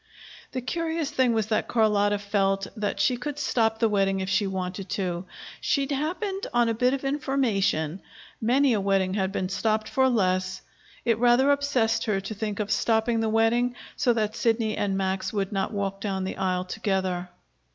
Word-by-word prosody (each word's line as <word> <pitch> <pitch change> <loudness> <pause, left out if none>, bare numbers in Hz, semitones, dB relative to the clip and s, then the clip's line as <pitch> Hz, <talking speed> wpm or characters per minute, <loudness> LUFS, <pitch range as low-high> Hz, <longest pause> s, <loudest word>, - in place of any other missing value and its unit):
The 255 - -2
curious 325 +2 -2
thing 260 -2 +2
was 220 -2 +1
that 215 - 0
Carlotta 205 -3 +2
felt 195 -1 0
that 210 -2 -2
she 250 - +2
could 285 +4 -5
stop 225 -6 +1
the 225 - +3
wedding 195 -2 +1
if 190 0 -3
she 195 +1 +2
wanted 185 0 -4
to. 180 -2 -2 0.4
She'd 280 0 0
happened 370 +8 -2
on 240 -1 +4
a 230 - +1
bit 250 +4 +2
of 275 - -6
information 220 - 0 0.4
many 255 +3 +3
a 210 - +1
wedding 195 -1 +1
had 195 -1 0
been 185 -2 -2
stopped 215 +2 0
for 265 0 +2
less. 185 -4 0 0.4
It 230 -2 +2
rather 245 +3 +5
obsessed 245 -6 +1
her 210 -3 +1
to 195 +3 -6
think 210 0 -4
of 210 0 -2
stopping 225 0 +2
the 225 -1 0
wedding, 235 +3 +2 0.2
so 260 -5 +2
that 215 -2 -1
Sidney 225 -2 +1
and 195 -1 -1
Max 190 0 -1
would 200 -1 -2
not 195 -2 -1
walk 195 -1 -3
down 190 -2 -2
the 190 - -4
aisle 185 -1 0
together. 185 -3 -2
215 Hz, 185 wpm, -26 LUFS, 195-245 Hz, 0.4 s, rather